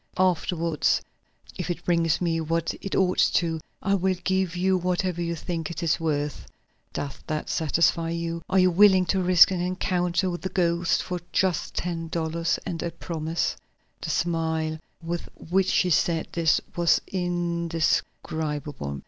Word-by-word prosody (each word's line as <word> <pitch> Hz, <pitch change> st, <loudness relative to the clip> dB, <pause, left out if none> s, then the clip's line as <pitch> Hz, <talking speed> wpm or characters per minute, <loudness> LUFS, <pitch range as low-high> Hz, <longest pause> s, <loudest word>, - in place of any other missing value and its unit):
Afterward 170 Hz, -3 st, +1 dB, 0.7 s
if 180 Hz, -1 st, -3 dB
it 175 Hz, -, -4 dB
brings 170 Hz, -2 st, +2 dB
me 165 Hz, -2 st, 0 dB
what 165 Hz, +1 st, -1 dB
it 195 Hz, -, -3 dB
ought 185 Hz, -1 st, +2 dB, 0.2 s
to, 165 Hz, -2 st, +1 dB, 0.2 s
I 200 Hz, -, +2 dB
will 190 Hz, -1 st, +2 dB
give 190 Hz, -1 st, 0 dB
you 185 Hz, +1 st, +2 dB
whatever 180 Hz, -1 st, -1 dB
you 170 Hz, 0 st, -1 dB
think 165 Hz, 0 st, -4 dB
it 170 Hz, -, -5 dB
is 165 Hz, 0 st, +1 dB
worth. 150 Hz, -3 st, -2 dB, 0.4 s
Does 140 Hz, -, -5 dB
that 155 Hz, -1 st, -3 dB
satisfy 165 Hz, +1 st, +2 dB
you? 170 Hz, 0 st, -3 dB
Are 190 Hz, -, +2 dB
you 185 Hz, -1 st, +5 dB
willing 190 Hz, 0 st, +6 dB
to 190 Hz, +1 st, +1 dB
risk 180 Hz, 0 st, +7 dB
an 180 Hz, -2 st, -1 dB
encounter 180 Hz, 0 st, 0 dB
with 175 Hz, -, -5 dB
the 190 Hz, -, -3 dB
ghost, 170 Hz, -2 st, +1 dB
for 180 Hz, -1 st, -3 dB
just 185 Hz, -4 st, 0 dB
ten 165 Hz, -2 st, -3 dB
dollars 165 Hz, 0 st, -1 dB
and 165 Hz, -, -3 dB
a 170 Hz, -, -2 dB
promise?" 165 Hz, 0 st, -2 dB, 0.5 s
The -, -, -4 dB
smile 160 Hz, -2 st, -1 dB, 0.2 s
with 170 Hz, +1 st, -4 dB
which 190 Hz, +3 st, 0 dB
she 180 Hz, -, +2 dB
said 165 Hz, 0 st, +1 dB
this 165 Hz, -2 st, +3 dB, 0.2 s
was 170 Hz, -1 st, +4 dB
indescribable. 165 Hz, -, -2 dB
170 Hz, 155 wpm, -26 LUFS, 165-180 Hz, 0.7 s, risk